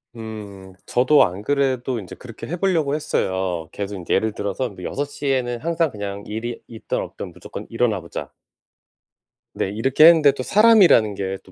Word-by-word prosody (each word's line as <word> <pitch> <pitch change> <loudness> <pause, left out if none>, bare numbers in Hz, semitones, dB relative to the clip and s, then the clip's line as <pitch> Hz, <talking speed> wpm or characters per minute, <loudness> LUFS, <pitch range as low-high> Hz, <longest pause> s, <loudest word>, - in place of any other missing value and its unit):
음. 105 -4 -9
저도 130 +4 +4
안 95 +4 -3
그래도 130 -3 0
인제 95 - -9
그렇게 115 -3 -10
해보려고 170 -5 0
했어요. 95 - -2
계속 100 0 -5
인제 90 -3 -3
예를 110 +2 +1
들어서 105 +5 -3
뭐 95 -3 -12
6:00 145 +5 -4
에는 125 -3 0
항상 165 -1 0
그냥 100 -2 -6
일이 115 +3 -5
있든 115 -1 -5
없든 - - -6
무조건 - - -9
일어나 115 -4 0
보자. 85 - -7 1.2
네. - - -2
이렇게 135 +8 +4
했는데 160 -4 +7
또 130 -2 -5
사람이라는 200 - +5
게 95 0 -3
또 95 - -18
115 Hz, 335 characters per minute, -22 LUFS, 100-140 Hz, 1.2 s, 했는데